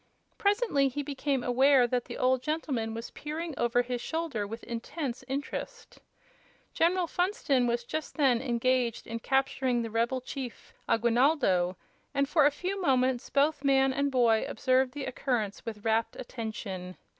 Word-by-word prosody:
Presently 405 - +2
he 285 +2 -3
became 280 -2 -1
aware 260 +1 +5
that 245 0 -1
the - - -7
old 255 0 +2
gentleman 255 -7 -2
was 230 +1 -6
peering 315 +2 -5
over 240 +1 +2
his 245 0 -3
shoulder 315 -11 -2
with 225 +2 -7
intense 240 +2 -5
interest. 295 - -5 0.7
General 350 +2 +2
Funston 330 -8 +1
was 235 0 0
just 310 +7 -5
then 260 -6 +3
engaged 245 -1 0
in 230 0 -5
capturing 265 -1 +1
the 225 - -5
rebel 235 +3 +1
chief, 255 -1 -7 0.2
Aguinaldo, 230 - +3 0.4
and 280 0 +2
for 295 0 +5
a - - +2
few 380 +6 -3
moments 255 -5 +1
both 290 +1 +2
man 270 -1 +4
and 280 +1 0
boy 235 -4 +3
observed 260 -1 +1
the 290 -1 -4
occurrence 235 -5 -2
with 215 -2 -6
rapt 225 0 +1
attention. 210 -7 -6
255 Hz, 150 wpm, -29 LUFS, 235-285 Hz, 0.7 s, aware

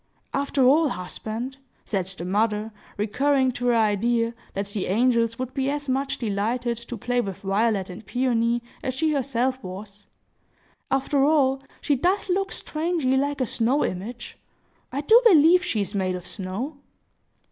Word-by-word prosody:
"After 280 -1 +1
all, 295 +4 +5
husband," 225 +6 -5 0.3
said 190 -4 -2
the 190 -2 -7
mother, 210 +3 0 0.3
recurring 260 +5 +2
to 245 0 -3
her 240 - +4
idea 230 +2 +2 0.2
that 200 +1 -1
the 200 -1 -3
angels 230 +2 +2
would 255 0 -4
be 270 -1 0
as 285 0 -3
much 270 +1 -1
delighted 235 +2 -1
to 235 +1 -7
play 245 +3 0
with 195 -3 -6
Violet 200 0 +1
and 185 +4 -9
Peony 240 -2 0 0.2
as 260 - -3
she 310 +2 +1
herself 260 -1 0
was,—"after 205 +7 -5
all, 275 -3 +3 0.2
she 290 - +2
does 370 +9 0
look 390 +2 0
strangely 310 -4 -1
like 285 +1 0
a - - +2
snow 245 +5 +1
image! 225 +7 -6 0.5
I 275 - -2
do 445 +11 +6
believe 355 -4 +6
she 225 -12 -1
is 200 +1 -4
made 185 -2 0
of 180 -1 -7
snow!" 210 +12 -5
245 Hz, 155 wpm, -25 LUFS, 210-275 Hz, 0.5 s, do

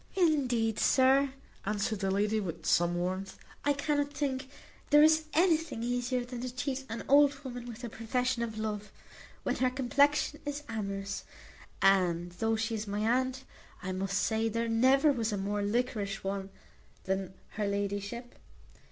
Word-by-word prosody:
"Indeed, 255 - +2
sir," 270 +1 +4 0.3
answered 210 +1 -1
the 195 -1 0
lady, 210 +3 +1
with 180 -6 -5
some 175 0 +3
warmth, 185 +2 -3 0.3
"I 290 - +3
cannot 285 0 0
think 275 -2 -2 0.4
there 295 0 +7
is 315 0 +5
anything 325 -7 +2
easier 245 +1 -1
than 245 -1 -6
to 250 0 -4
cheat 265 +1 -3
an 225 - -4
old 285 0 +6
woman 245 -2 -6
with 240 +1 -8
a 240 - -4
profession 245 +2 -1
of 225 -2 -3
love, 210 -1 -4 0.5
when - - -1
her 255 - +2
complexion 285 +3 +2
is 290 0 -4
amorous; 200 -3 -4 0.6
and, 175 -3 +3
though 225 +5 0
she 220 +1 -1
is 215 -1 -3
my 205 +1 -2
aunt, 255 +3 +1 0.4
I 185 - -3
must 195 +1 -1
say 220 +2 +1
there 230 +1 -1
never 260 +6 +4
was 230 -5 -1
a 205 - -1
more 205 +1 -1
liquorish 210 -2 -1
one 195 0 -3 0.5
than 190 0 -2
her 210 -1 -2
ladyship. 200 +4 -3
230 Hz, 160 wpm, -31 LUFS, 200-265 Hz, 0.6 s, there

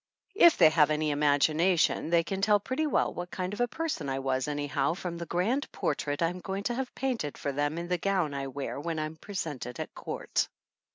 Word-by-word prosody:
If 345 -4 +6
they 160 -3 +7
have 155 -2 +4
any 155 0 +1
imagination 150 +5 +2
they 170 0 +4
can 190 +3 -3
tell 205 0 +4
pretty 260 +9 -1
well - - +1
what 175 0 -5
kind 185 +1 -3
of 210 - -3
a 245 - +3
person 315 - -3
I 135 - -1
was 130 0 -1
anyhow 145 0 0
from 175 -2 -5
the 170 - -5
grand 225 +11 0
portrait 145 +2 -1
I'm 175 +2 0
going 195 +2 -4
to 240 - 0
have 260 +1 -4
painted 245 - -2
for 140 - -2
them 145 +3 -1
in 170 +1 -4
the 180 0 0
gown 185 -5 0
I 135 -1 -3
wear 140 +1 -4
when 165 +2 -3
I'm 155 0 -3
presented 155 - -5
at - - -5
court. - - -2
170 Hz, 215 wpm, -29 LUFS, 145-195 Hz, -, they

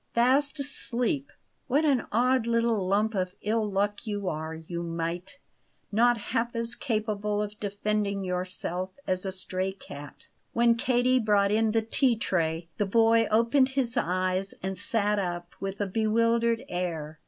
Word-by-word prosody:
Fast 275 +5 +3
asleep! 270 0 -1 0.4
What 290 +4 +2
an 275 -5 +2
odd 245 +1 +2
little 230 -4 +1
lump 210 +3 +2
of 185 -2 -2
ill 215 0 0
luck 205 +3 -1
you 205 -2 -3
are, 160 -1 -3
you 165 +2 -6
mite 170 +4 -4 0.5
not 240 +3 +4 0.2
half 235 +1 0
as 230 0 -1
capable 210 -4 -1
of 210 0 -4
defending 205 -1 -1
yourself 180 0 -3 0.2
as 185 +1 -1
a - - -1
stray 185 0 -2
cat!" 145 -6 -11 0.3
When 235 0 +4
Katie 250 +2 +2
brought 205 -3 +3
in 220 +1 +2
the 225 0 +1
tea 240 +2 +2
tray, 165 -5 -1
the 205 - +1
boy 225 +1 +4
opened 235 +5 +3
his 250 -2 +1
eyes 185 -2 0
and 190 0 -2
sat 210 0 +1
up 175 -2 -4
with 195 0 -4
a 205 - +1
bewildered 230 +3 +1
air. 160 -4 -4
210 Hz, 155 wpm, -28 LUFS, 185-235 Hz, 0.5 s, not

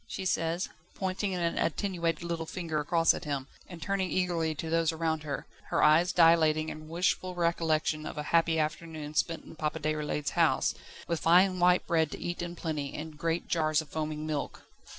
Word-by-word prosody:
she 190 - -5
says, 170 0 0 0.3
pointing 190 0 -2
an 170 -1 -1
attenuated 170 -2 -1
little 170 -1 -3
finger 165 -4 -3
across 165 +3 +3
at - - -6
him, 140 -4 -3 0.2
and 175 -3 -9
turning 195 -2 -1
eagerly 170 -4 0
to 160 +2 -5
those 165 0 +2
around 160 -1 -1
her, 145 -3 -4 0.2
her - - +2
eyes 160 +4 +5
dilating 160 -3 +4
in 155 0 -8
wishful 180 +2 0
recollection 160 -3 0
of - - -7
a 150 - -2
happy 165 -1 +4
afternoon 155 -1 -3
spent 165 +1 0
in - - -12
Papa 155 0 -2
Déroulède's 150 -1 -1
house, - - +2 0.3
with 170 -2 -1
fine 185 +2 +4
white 180 +1 +4
bread 160 -2 +2
to - - -7
eat 175 0 -4
in 175 0 -5
plenty, 155 -4 -4
and 155 0 -6
great 165 +1 -1
jars 155 -2 +2
of 155 -2 -5
foaming 155 0 -3
milk. 150 -2 -4
165 Hz, 185 wpm, -30 LUFS, 155-175 Hz, 0.3 s, eyes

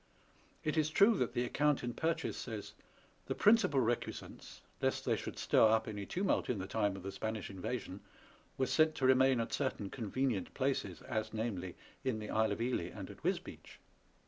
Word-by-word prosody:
It 155 +1 -1
is 155 -1 +3
true 200 +8 +5
that 125 - 0
the 120 - +1
account 145 +3 +1
in 120 0 -2
Purchas 165 +2 -1
says, 110 -4 -6 0.3
" - - -32
The - - -1
principal 205 -9 +5
recusants 120 0 -3 0.2
(lest - - 0
they - - +2
should - - -6
stir - - +3
up 110 0 +2
any 105 -2 -5
tumult 190 +2 0
in 125 - 0
the 95 - -4
time 105 -1 0
of 95 - -8
the 95 - -4
Spanish 110 +1 -4
invasion) 95 0 -4 0.6
were 130 - +2
sent 155 +4 +3
to 130 - 0
remain 130 -1 +5
at 115 - -2
certain 130 -8 -2
convenient 120 -2 -2
places, 135 0 -1
as, 110 -3 -3
namely, 100 -6 -3 0.3
in 130 -4 0
the 105 -1 -6
Isle 110 -1 +2
of 110 - -5
Ely 120 -8 0
and - - -8
at - - -14
Wisbeach." - - -3
120 Hz, 190 wpm, -34 LUFS, 105-135 Hz, 0.6 s, true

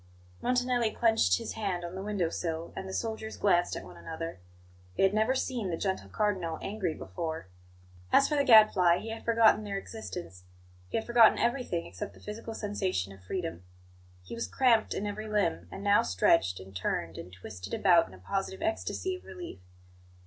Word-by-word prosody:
Montanelli 250 -2 +2
clenched 220 - +3
his - - -5
hand 190 -5 -2
on 170 - -6
the 190 - -5
window 200 -4 -1
sill, 165 -1 -4
and 190 - -5
the - - -6
soldiers 220 -1 -4
glanced 175 -3 +2
at - - -6
one 90 -2 -12
another: 160 - -6 0.6
they - - +3
had 195 +1 +4
never 220 +5 +2
seen 245 -6 -2
the 165 - -2
gentle 190 0 -2
Cardinal 190 -7 -1
angry 195 -6 -3
before. 160 - -5 0.7
As 275 - +6
for 300 - 0
the 285 - +3
Gadfly, 215 -8 +7
he 220 +5 -6
had 225 0 -6
forgotten 225 -2 +4
their 200 -1 -3
existence; 180 - -7 0.5
he - - -1
had 220 - -2
forgotten 235 -2 +6
everything 240 -8 0
except 90 - -7
the - - -15
physical 220 +2 -7
sensation 190 - -2
of 95 -1 -16
freedom. 165 - -4 0.6
He - - -9
was 230 - -3
cramped 235 -4 +3
in 205 - -2
every 210 +1 -4
limb; 200 - 0
and 195 - -8
now 205 0 +5
stretched, 90 - +2
and 95 +1 -12
turned, 85 -2 -2
and 90 - -9
twisted 95 +1 -7
about 175 -4 +5
in 95 - -13
a - - -14
positive 190 - -3
ecstasy 335 +2 -1
of - - -18
relief. 355 - -9
195 Hz, 185 wpm, -30 LUFS, 165-220 Hz, 0.7 s, Gadfly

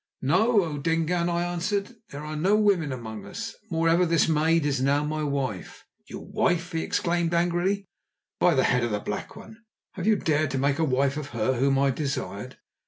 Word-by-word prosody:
"No, 200 - +3
O 150 -3 -4
Dingaan," 165 +3 0
I 170 0 0
answered; 195 +6 -2
"there 145 +1 -8
are 155 0 -5
no 185 +7 +2
women 200 -8 +2
among 110 -5 -6
us. 225 - -6
Moreover, 165 +1 +2
this 165 -2 +3
maid 160 0 +2
is 140 -3 0
now 140 +2 +2
my 155 +1 -2
wife." 135 -9 -3 0.2
"Your - - -8
wife!" 175 +1 0
he 165 -1 -1
exclaimed 170 0 0
angrily. 175 +4 +1 0.5
"By 175 -3 +4
the 130 - +3
Head 125 -1 +2
of 120 - 0
the 105 -1 -1
Black 105 - -5
One, 220 - -12 0.3
have 190 0 -5
you 220 - +5
dared 155 -5 +1
to 135 - -2
make 140 +2 +1
a - - +2
wife 140 0 +1
of 145 -2 -5
her 120 +5 +2
whom 135 +2 +2
I 135 0 +3
desired? 130 -5 -4
155 Hz, 195 wpm, -26 LUFS, 135-175 Hz, 0.5 s, you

